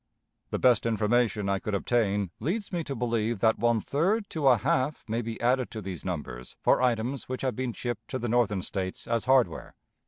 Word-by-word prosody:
The -, -, -1 dB
best 120 Hz, -3 st, +4 dB
information 110 Hz, -2 st, +1 dB
I 100 Hz, 0 st, +1 dB
could 105 Hz, 0 st, -2 dB
obtain 100 Hz, -3 st, 0 dB
leads 200 Hz, +7 st, -2 dB
me 170 Hz, -2 st, -1 dB
to 140 Hz, -, -4 dB
believe 115 Hz, -2 st, -1 dB
that 110 Hz, 0 st, +3 dB
one 120 Hz, -1 st, +3 dB
third 195 Hz, -, 0 dB
to 150 Hz, -4 st, 0 dB
a 125 Hz, -2 st, +7 dB
half 130 Hz, +7 st, 0 dB
may 115 Hz, +2 st, -1 dB
be 115 Hz, -1 st, -5 dB
added 125 Hz, +1 st, +1 dB
to 110 Hz, -, -6 dB
these 95 Hz, -5 st, -6 dB
numbers -, -, -5 dB
for -, -, +3 dB
items 125 Hz, +2 st, 0 dB
which 130 Hz, +1 st, -4 dB
have 130 Hz, -2 st, 0 dB
been 130 Hz, -1 st, -2 dB
shipped 120 Hz, -2 st, -5 dB
to 130 Hz, -, -3 dB
the 120 Hz, -, -3 dB
Northern 110 Hz, -5 st, +1 dB
States 95 Hz, -2 st, -4 dB
as 115 Hz, -1 st, 0 dB
hardware 130 Hz, -1 st, +2 dB
120 Hz, 200 wpm, -28 LUFS, 105-130 Hz, -, a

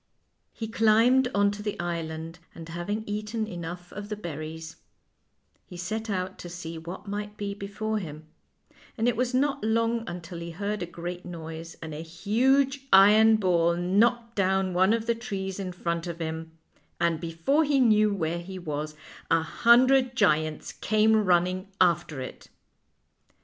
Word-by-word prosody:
He 225 Hz, -, -6 dB
climbed 225 Hz, +4 st, +4 dB
on 200 Hz, 0 st, +4 dB
to 205 Hz, 0 st, -7 dB
the 210 Hz, -1 st, -4 dB
island, 165 Hz, -1 st, -4 dB, 0.2 s
and 165 Hz, -1 st, -9 dB
having 185 Hz, +6 st, -3 dB
eaten 210 Hz, +2 st, -3 dB
enough 175 Hz, -2 st, -7 dB
of 205 Hz, 0 st, -7 dB
the 210 Hz, -, -2 dB
berries, 160 Hz, -3 st, -7 dB, 0.9 s
he 180 Hz, -, -10 dB
set 220 Hz, +5 st, -4 dB
out 185 Hz, -1 st, -3 dB
to 175 Hz, -, -8 dB
see 170 Hz, -1 st, -7 dB
w 165 Hz, +2 st, -7 dB
r -, -, -13 dB
hat -, -, -21 dB
might 210 Hz, +1 st, -5 dB
be 200 Hz, -1 st, -3 dB
before 210 Hz, +2 st, -3 dB
him, 155 Hz, -4 st, -8 dB, 0.7 s
and 225 Hz, +1 st, +1 dB
it 245 Hz, -, +2 dB
was 250 Hz, +2 st, 0 dB
not 275 Hz, -2 st, +1 dB
long 230 Hz, +1 st, +1 dB
until 175 Hz, 0 st, -7 dB
he 170 Hz, 0 st, -6 dB
heard 200 Hz, +4 st, -3 dB
a 175 Hz, -, -3 dB
great 175 Hz, +1 st, -6 dB
noise, 165 Hz, -1 st, -8 dB
and 160 Hz, -1 st, -6 dB
a 150 Hz, -, -5 dB
huge 260 Hz, +11 st, +1 dB
iron 215 Hz, +3 st, +7 dB
ball 170 Hz, -4 st, +2 dB
knocked 230 Hz, +7 st, +2 dB
down 190 Hz, -1 st, +1 dB
one 185 Hz, +3 st, +4 dB
of 230 Hz, -1 st, -1 dB
the 235 Hz, -, +2 dB
trees 200 Hz, -5 st, -5 dB
in 190 Hz, -2 st, -3 dB
front 170 Hz, -1 st, -3 dB
of 170 Hz, -1 st, -5 dB
him, 160 Hz, 0 st, -5 dB, 0.4 s
and 170 Hz, -2 st, +1 dB
before 170 Hz, -, +1 dB
he 285 Hz, -2 st, +2 dB
knew 215 Hz, -4 st, +4 dB
where 170 Hz, -3 st, -1 dB
he 185 Hz, +2 st, -8 dB
was 155 Hz, -3 st, -4 dB, 0.3 s
a 165 Hz, 0 st, +3 dB
hundred 255 Hz, +6 st, +4 dB
giants 155 Hz, -, +1 dB
came 215 Hz, +1 st, +3 dB
running 185 Hz, +1 st, +2 dB
after 170 Hz, -5 st, +2 dB
it. 130 Hz, -, -8 dB
190 Hz, 165 wpm, -27 LUFS, 170-220 Hz, 0.9 s, iron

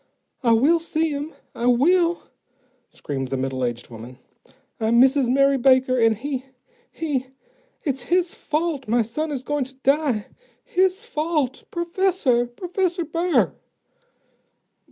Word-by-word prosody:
"I 235 Hz, -3 st, +4 dB
will 290 Hz, +9 st, +4 dB
see 325 Hz, -1 st, -1 dB
him, 290 Hz, +2 st, -4 dB, 0.2 s
I 235 Hz, -, -2 dB
will," 335 Hz, +8 st, +3 dB, 0.7 s
screamed 135 Hz, -3 st, -5 dB
the 135 Hz, +1 st, -3 dB
middle 130 Hz, 0 st, -2 dB
aged 120 Hz, -1 st, -3 dB
woman. 120 Hz, +3 st, -10 dB, 0.6 s
"I'm 225 Hz, +2 st, +3 dB
Mrs. 265 Hz, -1 st, +4 dB
Mary 275 Hz, +1 st, +3 dB
Baker, 260 Hz, 0 st, +4 dB
and 225 Hz, -2 st, +3 dB
he 265 Hz, +1 st, -4 dB, 0.4 s
he 280 Hz, -5 st, -3 dB, 0.6 s
it's 270 Hz, -4 st, -2 dB
his 355 Hz, 0 st, +2 dB
fault 305 Hz, -3 st, -2 dB
my 235 Hz, +2 st, +2 dB
son 300 Hz, +9 st, -3 dB
is 265 Hz, -3 st, -4 dB
going 290 Hz, 0 st, -1 dB
to 265 Hz, +1 st, -12 dB
die. 270 Hz, -4 st, +1 dB, 0.4 s
His 380 Hz, +4 st, +1 dB
fault. 305 Hz, -, -2 dB
_Professor! 340 Hz, -8 st, +1 dB
Professor 360 Hz, 0 st, -1 dB
Burr! 335 Hz, +3 st, +1 dB
275 Hz, 130 wpm, -23 LUFS, 240-335 Hz, 0.7 s, I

